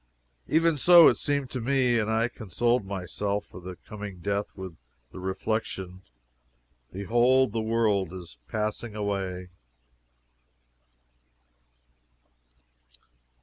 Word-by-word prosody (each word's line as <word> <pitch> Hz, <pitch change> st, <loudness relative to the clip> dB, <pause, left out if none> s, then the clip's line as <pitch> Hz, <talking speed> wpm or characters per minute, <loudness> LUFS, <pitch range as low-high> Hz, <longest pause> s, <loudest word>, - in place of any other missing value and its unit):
"Even 165 Hz, 0 st, +3 dB
so 175 Hz, +3 st, +8 dB
it -, -, 0 dB
seemed 140 Hz, -3 st, -1 dB
to 130 Hz, -, -4 dB
me 125 Hz, -1 st, +2 dB
and 110 Hz, -1 st, -1 dB
I 115 Hz, +1 st, +2 dB
consoled 120 Hz, 0 st, -1 dB
myself 100 Hz, +2 st, -3 dB
for 90 Hz, -, -12 dB
the 90 Hz, +1 st, -7 dB
coming 105 Hz, -3 st, -7 dB
death 100 Hz, +3 st, -1 dB
with 95 Hz, -3 st, -8 dB, 0.4 s
the 95 Hz, -, -9 dB
reflection: 95 Hz, -1 st, -3 dB, 0.9 s
BEHOLD, 120 Hz, +6 st, +3 dB
THE 115 Hz, +1 st, -1 dB
WORLD 110 Hz, -5 st, +1 dB
IS 85 Hz, -10 st, -10 dB
PASSING 110 Hz, +1 st, -3 dB
AWAY!" 95 Hz, -3 st, -3 dB
105 Hz, 105 wpm, -27 LUFS, 95-120 Hz, 0.9 s, so